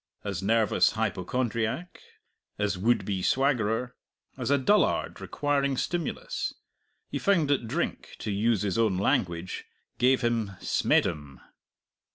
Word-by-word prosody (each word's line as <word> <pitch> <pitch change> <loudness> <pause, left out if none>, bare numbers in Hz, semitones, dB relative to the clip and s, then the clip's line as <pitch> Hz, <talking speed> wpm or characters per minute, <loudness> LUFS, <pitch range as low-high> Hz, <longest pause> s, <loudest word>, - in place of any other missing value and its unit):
As 100 -4 -3
nervous 105 -3 +3
hypochondriac, 110 - -2 0.6
as 105 -1 0
would 100 +2 +1
be 95 -2 -2
swaggerer, 125 0 +1 0.4
as - - -3
a 140 - +4
dullard 200 +10 +2
requiring 140 -2 0
stimulus, 175 - -2 0.6
he - - -2
found 185 -7 +3
that 130 -5 +1
drink, 160 +10 -3
to 105 - -4
use 105 +1 +1
his 100 +1 0
own 110 -5 +2
language, 90 -2 -1 0.3
gave 130 +1 +4
him 115 -4 0
"smeddum." 75 -5 0
115 Hz, 120 wpm, -28 LUFS, 100-135 Hz, 0.6 s, a